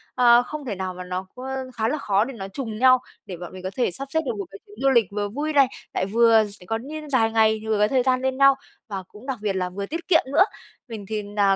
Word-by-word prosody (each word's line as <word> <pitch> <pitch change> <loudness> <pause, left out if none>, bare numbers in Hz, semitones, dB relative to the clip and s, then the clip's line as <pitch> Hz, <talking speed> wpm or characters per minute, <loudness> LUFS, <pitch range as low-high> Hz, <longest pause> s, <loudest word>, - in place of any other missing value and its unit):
à, 240 -1 +6
không 300 +3 -7
thể 220 -6 -3
nào 185 0 -4
mà 180 0 -7
nó 180 +1 -4
ơ, 260 +1 -5
khá 220 -1 0
là 300 - 0
khó 205 -6 +2
để 270 - -7
nó 195 -5 -6
trùng 220 +1 -5
nhau 255 0 +6 0.3
để 180 -3 -7
bọn 175 +1 -9
mình 185 -1 -9
có 185 - -2
thể 245 -7 +1
sắp 275 +10 -6
xếp 320 - +3
được 245 -4 -2
một 200 - -4
cái 195 - -11
chuyến 205 - -16
du 275 - +4
lịch 235 -5 +4
vừa 205 0 -2
vui 295 +8 -3
này, 280 -2 +6 0.3
lại - - 0
vừa 225 +1 +5
sẽ 200 -3 -14
có 225 +4 -1
nh 300 +5 -8
dài 225 -4 +3
ngày 220 -1 +4
thì 220 - -9
vừa 215 -1 +1
có 210 - +4
thời 255 0 +2
gian 255 0 +2
lên 260 0 -1
nhau 275 0 +6 0.3
và 195 -4 -5
cũng 210 +5 -15
đặc 265 -2 -3
biệt 205 -2 -1
là 180 -1 -1
vừa 200 +2 -5
tiết 330 +10 -6
kiệm 340 -4 +5
nữa. 335 +6 +7 0.4
Mình 220 -4 -7
thì 215 -1 -2
nà 205 -1 +2
225 Hz, 290 wpm, -24 LUFS, 200-265 Hz, 0.4 s, nữa